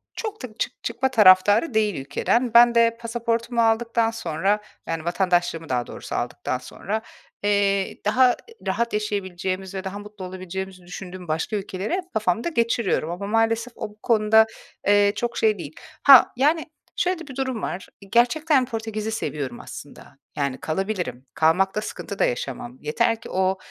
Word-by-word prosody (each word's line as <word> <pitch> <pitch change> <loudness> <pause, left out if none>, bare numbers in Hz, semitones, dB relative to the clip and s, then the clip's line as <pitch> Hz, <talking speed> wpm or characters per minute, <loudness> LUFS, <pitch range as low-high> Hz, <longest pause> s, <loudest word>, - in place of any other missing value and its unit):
Çok 430 - -5
da - - -3
çık - - -3
çıkma 265 - 0
taraftarı 205 - +6
değil 215 -3 +2
ülkeden. 230 - 0
Ben 240 0 +7
de 230 0 +4
pasaportumu 235 0 -1
aldıktan 230 0 +2
sonra, 205 -1 -1 0.3
yani, 165 -1 -3
vatandaşlığımı 175 -2 0
daha 125 -2 -1
doğrusu - - -7
aldıktan - - -2
sonra, 215 +3 -5 0.4
eee, 200 -1 +1
daha, 250 +4 +5
eee, 460 - -9
rahat 235 +5 0
yaşayabileceğimizi 190 -2 -3
ve 190 - -4
daha 200 +1 -5
mutlu 210 -2 -9
olabileceğimizi 185 0 -6
düşündüğüm 180 0 -9
başka 160 +7 -1
ülkeleri 195 - -3
hep 365 -1 -3
kafamda 220 - 0
geçiriyorum. 230 - 0
Ama 190 +3 -5
maalesef 225 +2 +1
o, - - -5
bu 210 +1 -20
konuda, 220 -1 +5 0.4
eee, 205 0 +5
çok 240 0 -3
şey 215 -2 +3
değil. 155 -2 -8 0.3
Ha, 270 -3 +9
yani, 305 +4 +2 0.3
şöyle 365 -1 0
de 330 - -10
bir 265 - -9
durum 260 -4 -2
var: 185 - -4 0.2
Gerçekten 260 +4 +3
Portekiz'i 220 -2 -4
seviyorum 145 - -4
aslında. 140 0 -11 0.2
Yani 140 -2 -1
kalabilirim. 170 - -3
Kalmakta 190 +6 +2
sıkıntı 200 -2 -7
da - - +4
yaşamam. 125 0 -4
Yeter 225 +9 0
ki - - -10
o, 190 +1 +1
210 Hz, 155 wpm, -23 LUFS, 185-235 Hz, 0.4 s, Ha